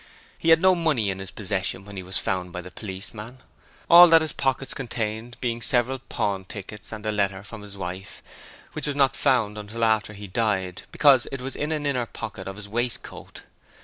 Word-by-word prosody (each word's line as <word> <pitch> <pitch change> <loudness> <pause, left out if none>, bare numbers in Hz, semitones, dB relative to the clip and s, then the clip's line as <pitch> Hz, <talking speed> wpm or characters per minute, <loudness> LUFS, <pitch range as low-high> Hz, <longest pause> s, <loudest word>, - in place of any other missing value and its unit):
He 165 - +1
had 165 +1 +6
no 185 0 +7
money 150 - +1
in 95 - -6
his 95 -1 -3
possession 100 -1 -3
when 100 0 -10
he 95 - -5
was 95 +1 -3
found 90 -2 -2
by 90 - -5
the 90 +1 -11
policeman; 105 +4 -7 0.5
all 175 +1 +10
that 165 -1 +6
his 155 - -3
pockets 135 0 -1
contained 115 -2 -4
being 120 -1 -2
several 125 +2 +4
pawn 100 -6 -2
tickets 105 +1 -8
and 110 -1 -7
a 110 - +1
letter 100 -2 -1
from 105 +1 -10
his 100 -1 -9
wife, 95 +1 -7 0.5
which - - -4
was 145 - -1
not 135 -2 +3
found 115 -7 +1
until 110 +2 -2
after 110 -1 +1
he 105 0 -9
died, 95 -3 -1
because 135 -4 +5
it 135 - -4
was 135 +1 -6
in 150 +2 -2
an 150 -2 -2
inner 125 -4 0
pocket 110 -5 -7
of 95 - -5
his 105 0 -8
waistcoat. 120 +3 -4
110 Hz, 205 wpm, -25 LUFS, 100-130 Hz, 0.5 s, all